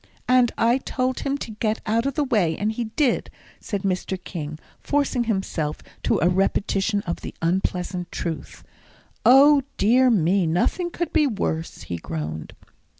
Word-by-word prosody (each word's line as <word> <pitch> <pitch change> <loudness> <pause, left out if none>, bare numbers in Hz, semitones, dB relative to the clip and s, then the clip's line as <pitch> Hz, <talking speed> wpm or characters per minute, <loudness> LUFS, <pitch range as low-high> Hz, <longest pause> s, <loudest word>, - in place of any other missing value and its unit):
"And 250 -2 +4
I 235 +3 +3
told 255 -1 -2
him 280 0 -1
to 235 - -6
get 215 0 -1
out 230 +4 +1
of 275 - -2
the 300 - +1
way 205 - +1
and 210 +1 0
he 235 +1 -3
did," 245 +4 0 0.3
said 200 -2 -4
Mr. 190 0 -1
King, 155 -4 -6 0.2
forcing 280 -4 0
himself 190 -8 -2 0.2
to - - +1
a - - +5
repetition 195 +2 +1
of 170 - -4
the - - -7
unpleasant 180 +1 -1
truth. 165 -3 -5 0.6
"O 280 +3 +7 0.2
dear 250 +5 +4
me, 185 -3 +3
nothing 180 - 0
could 345 -1 -4
be 305 -2 +4
worse," 165 -8 -3
he 85 - -4
groaned. 80 -1 -5
210 Hz, 155 wpm, -23 LUFS, 175-255 Hz, 0.6 s, O